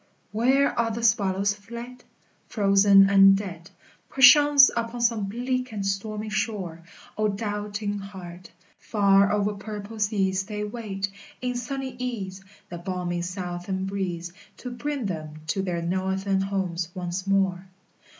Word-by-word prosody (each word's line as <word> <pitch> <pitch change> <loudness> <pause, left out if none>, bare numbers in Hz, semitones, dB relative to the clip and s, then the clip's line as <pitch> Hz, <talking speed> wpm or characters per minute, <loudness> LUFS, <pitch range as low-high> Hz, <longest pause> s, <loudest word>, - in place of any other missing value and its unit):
Where 260 +6 +3
are 230 -1 +2
the 225 +1 -4
swallows 200 -3 +2
fled? 235 +4 -10 0.4
Frozen 195 -2 +5
and 195 0 +7
dead 180 -4 -7 0.4
Perchance 280 +1 +7
upon 235 +1 -3
some 230 -3 +1
bleak 250 +4 -2
and 205 -2 -4
stormy 210 +2 -3
shore. 205 -6 -3 0.4
O 215 - +3
doubting 205 0 -3
heart! 185 -3 -10 0.3
Far 200 -2 +3
over 210 0 +1
purple 210 +1 -8
seas 195 -3 +1
They 210 0 -4
wait, 205 -3 -4 0.3
in 250 0 -2
sunny 260 +1 -4
ease, 195 -7 -5 0.3
The 175 - -7
balmy 175 -1 -3
southern 180 +1 -4
breeze 180 -3 -4 0.2
To 250 - -7
bring 280 0 -3
them 155 -4 -5
to 175 +5 -1
their 175 -3 -2
northern 190 +2 0
homes 185 -3 -2
once 180 +1 -4
more. 190 -1 +1
200 Hz, 130 wpm, -25 LUFS, 190-225 Hz, 0.4 s, and